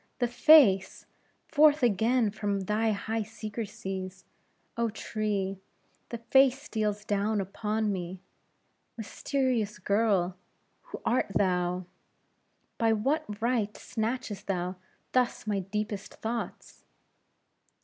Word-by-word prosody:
the 245 - +1
face! 245 -6 +5 0.4
forth 300 -1 +5
again 230 +1 +3
from 205 -2 -2
thy 210 +4 0
high 220 +2 -1
secrecies, 205 -3 -6 0.5
oh, 235 -1 0
tree! 205 -3 -2 0.5
the 235 - -4
face 265 +3 +4
steals 215 -7 -2
down 205 +1 0
upon 210 +2 -1
me. 180 0 -5 0.8
Mysterious 235 -1 -1
girl! 195 -2 +1 0.5
who - - -6
art 245 - +2
thou? 180 -1 +1 0.9
by 225 -1 +3
what 215 -2 -1
right 230 -4 0
snatchest 220 -3 -4
thou 180 -1 -2 0.4
thus 250 -3 +1
my 205 -2 0
deepest 205 +1 -4
thoughts? 230 +1 -5
215 Hz, 100 wpm, -29 LUFS, 195-235 Hz, 0.9 s, face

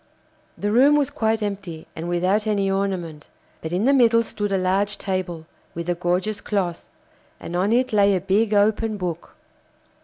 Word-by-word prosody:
The 205 - -1
room 270 +6 +5
was 290 -3 +1
quite 220 -1 0
empty, 195 -6 -5
and 165 +2 -5
without 185 +5 +1
any 200 -2 +1
ornament, 185 -6 -3 0.3
but 160 - -5
in 185 +5 0
the 275 - +4
middle 230 -3 +4
stood 210 -2 -4
a 195 - +2
large 195 +2 0
table, 180 -4 -4 0.3
with 170 0 -5
a 175 - +1
gorgeous 180 +4 -1
cloth, 185 -5 -2 0.5
and 175 - -7
on 190 +4 +1
it 250 0 +1
lay 200 -1 +4
a - - +1
big 200 +4 +1
open 215 +1 +2
book. 175 -3 -5
200 Hz, 175 wpm, -22 LUFS, 180-215 Hz, 0.5 s, room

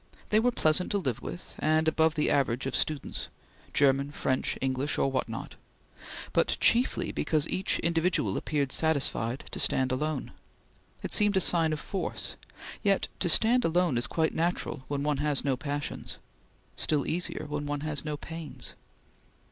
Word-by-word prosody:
They 215 - +4
were 245 +3 +3
pleasant 160 -4 +2
to - - +3
live 135 - -2
with, 175 - -8
and 155 +1 +2
above 160 0 +3
the 150 - +1
average 130 -3 +1
of 135 - -1
students 155 -3 -1 0.4
German, 140 0 +3
French, 130 -2 -1
English, 135 +2 -1
or 135 - +2
what 130 -3 -1
not 115 - -7 0.8
but - - +2
chiefly 245 +2 +2
because 155 -2 +1
each 190 - +1
individual 165 - +1
appeared 140 -3 -1
satisfied 140 -6 +1
to - - -5
stand 130 0 +2
alone. 150 +1 -2 0.7
It - - -3
seemed 205 -2 +4
a - - +6
sign 165 -3 +3
of 155 - -2
force; 195 +4 -3 0.5
yet 200 -2 +2
to 175 - 0
stand 235 +8 +5
alone 170 -3 +2
is 120 -1 0
quite 160 -1 0
natural 165 -5 -1
when 140 -1 -2
one 150 -1 +1
has 150 -2 +2
no 135 -2 +2
passions; 145 +2 -4 0.6
still 150 -3 +1
easier 170 -2 -2
when 145 0 -3
one 145 0 -2
has 150 -1 -1
no 150 -1 -3
pains. 160 -1 -7
150 Hz, 165 wpm, -29 LUFS, 140-165 Hz, 0.8 s, a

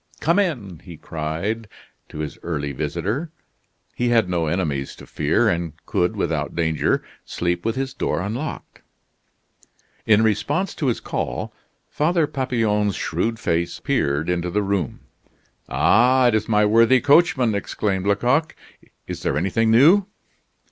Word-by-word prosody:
"Come 170 +5 +2
in!" 115 - -2
he 85 -3 -12
cried 85 +10 -4 0.4
to - - -10
his 75 - -6
early 70 -4 -3
visitor. 85 - -3 0.6
He 120 0 0
had 115 -5 +3
no 85 -3 -1
enemies 75 -5 -2
to - - -13
fear, - - +1
and 85 -2 -1
could, 90 - 0
without - - -2
danger, 80 -2 0 0.2
sleep 85 0 -2
with 115 +2 -1
his 135 0 -3
door - - -1
unlocked. 120 +11 -5 1.3
In 110 0 +5
response 140 - 0
to 145 - -2
his 120 - 0
call, - - -4 0.3
Father 165 +2 +1
Papillon's 115 -8 0
shrewd 110 +8 -2
face 85 -4 -1
peered 70 +3 0
into 90 0 -1
the 105 +4 0
room. 95 -8 -2 0.7
"Ah! 125 +3 +4
it - - 0
is 110 0 0
my 105 -1 +4
worthy 115 +4 +5
coachman!" 145 -4 +3
exclaimed 100 -1 -2
Lecoq. 125 +10 +1 0.5
"Is - - -6
there 70 - -1
anything 95 +7 +1
new?" 165 - +5
105 Hz, 140 wpm, -22 LUFS, 85-130 Hz, 1.3 s, In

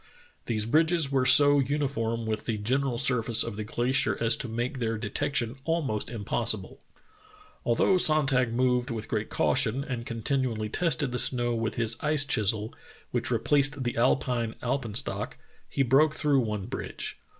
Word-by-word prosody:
These 110 -3 -1
bridges 160 +3 +2
were 130 -2 +1
so 145 +2 +8
uniform 130 -5 -2
with 110 -1 -3
the 110 - -1
general 125 +4 -1
surface 115 -2 +4
of 115 -3 -5
the 110 - -4
glacier 120 -1 0
as 115 0 +2
to - - -4
make 120 +4 -3
their 115 -1 -2
de 105 -2 -6
tection 135 -3 -1
almost 145 -10 -2
impossible. 110 -2 -2 0.8
Although 120 +11 +2
Sonntag 135 -8 +2
moved 125 +1 0
with 115 -2 -5
great 110 -1 -3
caution 130 0 +1
and 125 -4 -5
continually 115 -2 -2
tested 145 -2 0
the 125 - -1
snow 120 -2 +1
with 115 -1 -3
his 115 0 0
ice 150 -1 +3
chisel, 110 -2 0 0.4
which - - -1
replaced 145 -1 +1
the 120 - -3
Alpine 120 -1 0
alpen 120 -4 -3
stock, 100 -2 -3 0.3
he 135 - 0
broke 145 +5 +3
through 145 -3 +1
one 105 -5 -3
bridge. - - -6
120 Hz, 160 wpm, -27 LUFS, 115-140 Hz, 0.8 s, so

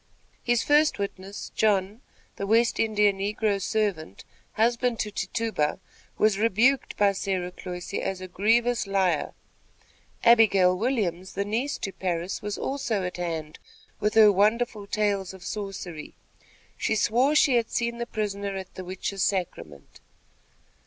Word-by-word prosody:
His 240 -1 +1
first 295 +1 +3
witness 200 0 -6
John, 205 +1 +1 0.4
the 200 - -3
West 230 +2 +3
India 210 -2 +3
negro 200 +1 -1
servant, 195 - -2 0.3
husband 235 +1 +1
to 210 - -3
Tituba, 215 -8 -2 0.4
was 210 -2 +2
rebuked 230 +5 +2
by 205 -1 +4
Sarah 190 -2 -2
Cloyse 180 +1 -8
as 195 -1 -2
a 185 - -7
grievous 230 +5 +1
liar. 190 -5 0 0.9
Abigail 205 -6 +5
Williams, 190 -5 -2
the 200 +1 -2
niece 235 +7 -2
to 195 - -4
Parris, 180 -1 -3
was 210 -1 -4
also 240 -8 -2
at 180 0 -4
hand 165 -3 -4 0.4
with 210 0 0
her 215 -2 +8
wonderful 210 +1 +1
tales 200 -3 -1
of 185 - -13
sorcery. 190 -6 -6 0.6
She 220 - 0
swore 245 +7 +2
she 275 -4 +5
had 230 -1 0
seen 235 0 -2
the 235 - -3
prisoner 200 -3 -3
at 190 -1 -7
the 185 - -7
witches' 190 +1 -4
sacrament. 85 - -3
205 Hz, 140 wpm, -26 LUFS, 185-225 Hz, 0.9 s, her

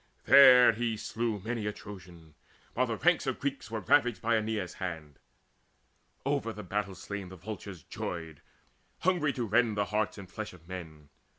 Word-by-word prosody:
There 125 -4 +8 0.2
slew 115 0 -2
he 100 +2 -12
many 115 -3 -2
a - - 0
Trojan, 90 -6 -12 0.4
while 125 +1 +1
the 115 -2 -2
ranks 175 -5 +2
Of 130 - -1
Greeks 140 -2 -3
were 110 -1 -3
ravaged 125 -4 +3
by 115 +1 +1
Aeneas' 110 -4 -2
hand. 80 -6 -5 1.1
Over 140 -5 0
the 105 -1 -8
battle 100 +1 -3
slain 100 +1 -6
the 95 - -10
vultures 95 -2 -8
joyed, 80 -4 -6 0.6
Hungry 175 -5 +2
to 120 - -2
rend 110 0 +2
the 100 - +2
hearts 105 0 0
and 100 -2 -9
flesh 110 +3 -7
of 85 -2 -17
men. 80 -5 -9
105 Hz, 170 wpm, -30 LUFS, 90-120 Hz, 1.1 s, There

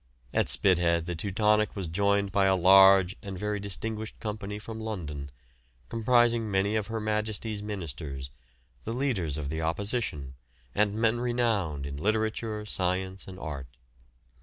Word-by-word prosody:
At - - +2
Spithead 85 -3 +4
the 90 - -3
"Teutonic" 105 +4 +1
was 95 -3 -3
joined 100 +3 +1
by 100 0 +3
a 95 0 +4
large 95 +1 +7
and 100 -3 -6
very 105 +2 -2
distinguished 110 +2 -5
company 105 -1 -4
from 110 +1 -7
London, 80 -11 -5 0.6
comprising 120 -1 +3
many 100 +2 +1
of 105 -3 -1
Her 115 0 -3
Majesty's 110 0 -2
Ministers, 75 -9 -5 0.5
the 115 - -4
leaders 110 - -1
of 70 -2 -4
the 80 +2 -3
opposition, 85 - -2 0.4
and 105 0 +1
men 115 +1 +2
renowned 115 - 0
in 70 0 -5
literature, 110 +3 -1
science 95 -1 -2
and 95 -1 -9
art. 70 -8 -7
100 Hz, 140 wpm, -28 LUFS, 85-110 Hz, 0.6 s, large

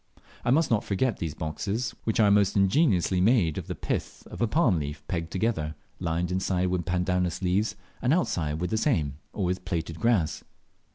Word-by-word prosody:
I - - 0
must 145 +3 +3
not 110 -3 +3
forget 110 +3 0
these 80 -3 -4
boxes, 100 +9 -3
which 110 - 0
are 105 -2 +5
most 100 0 +3
ingeniously 95 - +3
made 95 - +3
of - - -9
the - - -4
pith - - -4
of - - -7
a 120 - +3
balm 115 - +3
leaf 75 0 -6
pegged 85 -2 -2
together, 85 -5 -1 0.2
lined 85 0 -1
inside 90 0 0
with 90 -1 -1
pandanus 90 0 0
leaves, 95 +5 +1 0.3
and 125 - +2
outside 85 - +1
with 90 +4 -2
the 110 - +1
same, 75 - 0
or 100 - -2
with 90 +1 -1
plaited 85 -2 -3
grass. 110 -10 +1
95 Hz, 185 wpm, -27 LUFS, 85-110 Hz, 0.3 s, are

